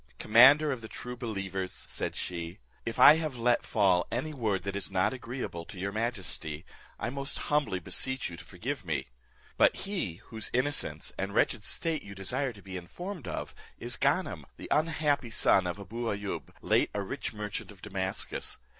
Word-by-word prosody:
"Commander 135 +7 +7
of 130 -3 -3
the 110 - -7
true 125 +2 -6
believers," 95 -6 -4
said - - -3
she, 85 0 -4 0.3
"if 115 - -2
I 150 +2 +10
have 155 -5 -2
let 120 +1 +3
fall 95 -5 +3
any 150 +6 -2
word 110 -9 0
that 100 0 -3
is 100 - -2
not 95 +5 +2
agreeable 125 -9 -5
to 95 - -10
your 100 +2 -2
majesty, 95 -8 -3 0.3
I 115 - -2
most 140 +1 0
humbly 145 -10 +1
beseech 130 +9 0
you 85 - -7
to - - -10
forgive - - -4
me; - - -2 0.5
but - - +6
he 190 - -2
whose 110 -2 -3
innocence 125 - 0
and 95 +1 -2
wretched 115 - +3
state 160 +8 0
you 100 0 -10
desire 125 +8 -1
to 100 -4 -14
be 95 -1 -6
informed 175 - -7
of - - -4 0.2
is - - -1
Ganem, - - +1
the - - -8
unhappy 150 -5 +2
son 95 -4 +4
of 90 - -3
Abou 115 +4 -5
Ayoub, 100 -1 -3
late - - +3
a 100 - 0
rich 130 +8 -4
merchant 105 -1 -5
of 95 -2 -16
Damascus. 95 -2 -2
110 Hz, 180 wpm, -30 LUFS, 95-130 Hz, 0.5 s, I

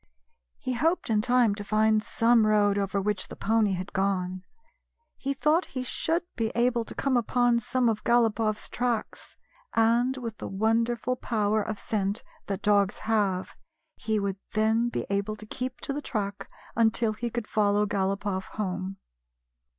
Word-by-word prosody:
He 255 - -3
hoped 320 +1 +1
in 210 -1 +3
time 245 -2 +3
to 205 0 -5
find 215 +1 +3
some 230 -1 +3
road 205 -1 +3
over 200 0 0
which 200 -1 -1
the - - -9
pony 220 -2 +2
had 185 +1 -5
gone. 185 -1 -1 0.7
He 275 - -3
thought 305 +6 +2
he 255 - -1
should 330 +7 -1
be 225 -2 -1
able 240 0 +2
to - - -8
come 275 -2 0
upon 245 0 +2
some 245 +2 0
of 220 -2 0
GalopofFs 225 -2 +2
tracks, 240 -2 -3 0.4
and, 235 +3 +3
with 230 -4 -6
the - - -5
wonderful 230 +4 0
power 215 -3 0
of 215 0 -4
scent 200 0 -2 0.2
that 200 +1 -3
dogs 205 -1 +3
have, 205 -4 0 0.4
he 220 -1 -1
would 200 -1 -2 0.2
then 220 +2 +2
be - - -3
able 200 +2 0
to 215 - -11
keep 255 +3 -5
to 275 - -3
the 295 - -3
track 205 -6 -4 0.3
until 225 -1 +3
he 235 +2 -3
could 235 -1 -3
follow 210 -1 +2
Galopoff 195 -1 -1
home. 190 -1 -3
220 Hz, 160 wpm, -27 LUFS, 205-240 Hz, 0.7 s, in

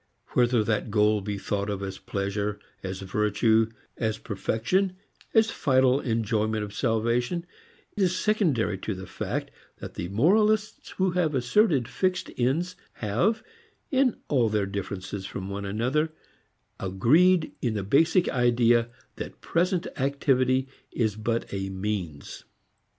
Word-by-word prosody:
Whether 120 -2 +3
that 105 +1 -1
goal 105 0 +3
be 100 +1 -3
thought 100 +1 -2
of 100 -1 -3
as 95 -1 -5
pleasure, 100 +1 -2 0.2
as 95 0 -5
virtue, 105 +3 +2 0.3
as 110 -2 -1
perfection, 115 - -1 0.4
as 220 0 +5
final 130 -1 +3
enjoyment 110 -3 0
of 100 -1 -7
salvation, 120 +9 0 0.5
is 185 -3 +1
secondary 155 - +1
to 105 +1 -3
the 95 0 -7
fact - - -4 0.3
that - - -8
the 85 - -4
moralists 210 - +2
who 190 -1 +2
have 170 -4 +1
asserted 135 - +3
fixed 185 +7 -1
ends 155 +9 0 0.2
have 120 - 0 0.5
in 260 -3 +3
all 125 -6 +2
their 105 -1 +1
differences 100 0 -5
from 95 0 -6
one 100 0 -4
another 125 +10 0 0.7
agreed 155 - +3
in 115 -4 0
the 100 - -2
basic 160 - +3
idea 120 -1 +3 0.3
that - - -7
present 175 +1 0
activity 130 -1 +2 0.2
is 110 -4 0
but 115 +2 -1
a 95 0 -2
means. 95 -6 -4
115 Hz, 130 wpm, -27 LUFS, 105-155 Hz, 0.7 s, as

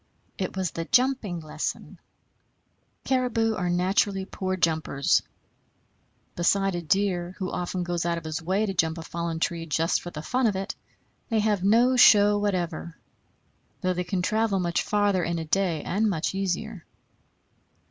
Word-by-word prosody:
It 190 0 -3
was 185 -3 -1
the 165 - -4
jumping 250 -9 +1
lesson. 155 - -5 1.0
Caribou 245 -4 +1
are 180 -4 -2
naturally 190 +2 +1
poor 185 -1 -3
jumpers. 160 -5 +1 1.1
Beside 195 +2 +2
a 175 - -2
deer, 180 +1 0
who 185 -2 -3
often 180 0 -3
goes 175 -1 -2
out 170 0 0
of 170 - -6
his 160 +1 -4
way 190 +6 0
to 195 - -2
jump 160 -2 0
a 165 - -6
fallen 170 0 -4
tree 165 0 -2
just 165 +2 +1
for 175 - -7
the 155 -3 -8
fun 255 +6 +1
of 205 - 0
it, 195 +1 -3 0.6
they 225 - +1
have 210 -3 +1
no 235 +6 +4
show 205 -3 +7
whatever; 175 -5 -2 0.8
though 185 -2 +1
they 180 0 -2
can 180 0 -2
travel 215 0 +1
much 175 -1 0
farther 205 -3 +1
in 170 0 -1
a 165 - -4
day 170 -2 0
and 210 +4 +1
much 170 -2 -1
easier. 195 0 -3
185 Hz, 160 wpm, -26 LUFS, 170-205 Hz, 1.1 s, show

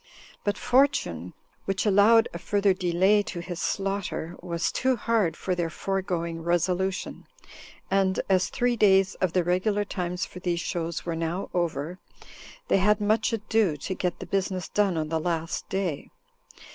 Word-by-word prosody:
But 205 - 0
fortune, 245 - +1 0.3
which 195 +1 -1
allowed 215 +3 +5
a 170 - -5
further 200 +1 +2
delay 185 +3 +3
to 190 -3 -6
his 170 0 -6
slaughter, 195 -4 -2
was 170 -1 -1
too 260 0 +1
hard 225 -6 0
for 185 - -2
their 175 -2 -1
foregoing 170 -3 -3
resolution; 180 +3 -1 0.6
and 190 -1 +2
as 185 -1 +2
three 245 -2 +1
days 195 -3 +4
of 185 -3 +1
the 180 - +2
regular 200 +4 +1
times 180 -3 -3
for 180 - -10
these 175 -1 -1
shows 170 -1 -3
were 170 -1 -2
now 165 +3 -3
over, 170 0 -2 0.7
they - - +3
had 210 +2 +3
much 215 +3 +1
ado 215 -6 +1
to 190 - -4
get 180 -1 -2
the 185 - -7
business 185 0 -2
done 200 -5 +1
on 155 -1 -2
the 160 0 0
last 165 0 -2
day. 190 -7 -2
185 Hz, 160 wpm, -26 LUFS, 170-200 Hz, 0.7 s, allowed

